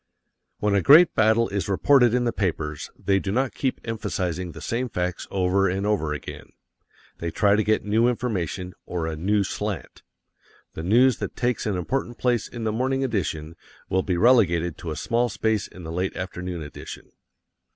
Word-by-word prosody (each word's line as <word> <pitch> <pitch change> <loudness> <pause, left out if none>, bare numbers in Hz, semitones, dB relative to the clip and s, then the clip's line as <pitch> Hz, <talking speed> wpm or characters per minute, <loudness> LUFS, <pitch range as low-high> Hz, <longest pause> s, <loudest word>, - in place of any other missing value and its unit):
When 105 -1 0
a 100 - +3
great 160 - +7
battle 110 +1 +3
is 100 0 -2
reported 120 +5 +4
in 125 - +2
the 120 - 0
papers, 75 -6 -2
they 95 -1 +1
do 95 - -3
not 130 +4 0
keep 130 -2 -2
emphasizing 90 -6 -3
the - - -10
same 125 +2 -2
facts 90 -3 -3
over 95 0 +2
and 95 +2 -2
over 100 -8 0
again. 75 - -7 0.7
They 85 - -2
try 100 +4 +3
to 110 - +2
get 110 0 +1
new 110 +3 +3
information, 95 -7 -2
or 85 -2 -2
a 80 -1 -3
"new 100 +6 +1
slant." 105 0 -5 0.7
The - - -6
news 120 +8 +4
that - - -5
takes 120 -2 -1
an 100 -3 0
important 120 +6 -3
place 120 -3 0
in 120 -2 -7
the 110 - 0
morning 130 +4 0
edition 85 - -2 0.3
will 95 - +2
be 90 -2 -1
relegated 85 -7 +3
to 85 - -6
a 80 - -3
small 120 +6 0
space 105 +1 0
in 90 - -12
the 80 - -6
late 90 +3 -2
afternoon 90 -2 -5
edition. 75 - -10
100 Hz, 185 wpm, -24 LUFS, 90-115 Hz, 0.7 s, great